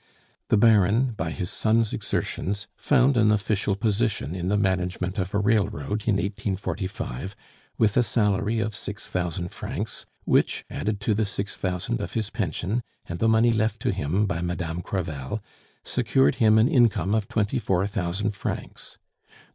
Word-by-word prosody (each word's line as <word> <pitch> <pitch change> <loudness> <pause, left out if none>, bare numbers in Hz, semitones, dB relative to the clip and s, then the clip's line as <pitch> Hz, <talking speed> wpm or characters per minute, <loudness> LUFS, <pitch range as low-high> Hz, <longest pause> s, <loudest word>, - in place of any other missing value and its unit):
The 110 - +3
Baron 110 +3 +4
by 80 -4 -2
his 90 +2 -4
son's 110 0 +2
exertions 100 +1 -2
found 135 -1 +3
an 110 -2 +5
official 100 -1 +1
position 105 - 0
in 90 -1 -3
the 105 +2 +2
management 95 0 0
of 95 +2 -2
a - - +4
railroad, 105 -2 0
in 105 - +4
1845, 95 - -3 0.4
with 105 -2 +3
a - - +5
salary 105 -1 +1
of 110 -1 -2
six 100 0 -5
thousand 90 -1 -2
francs, - - -5 0.2
which, - - +2
added 105 -1 -2
to 105 +1 +1
the 105 0 +1
six 100 0 -3
thousand 90 -9 -2
of - - -5
his 110 -2 -2
pension 100 - -1 0.2
and 85 0 -6
the 115 - +3
money 115 +1 +4
left 110 0 0
to - - +1
him 90 +4 0
by 100 -4 -2
Madame 85 -1 -3
Crevel, 80 -2 -3 0.4
secured 70 +2 +2
him 110 -1 +6
an 110 +2 +5
income 120 - +3
of 110 -2 +1
twenty 105 0 0
four 95 -4 +1
thousand 100 +1 -1
francs. 100 - -6
100 Hz, 160 wpm, -25 LUFS, 90-110 Hz, 0.4 s, him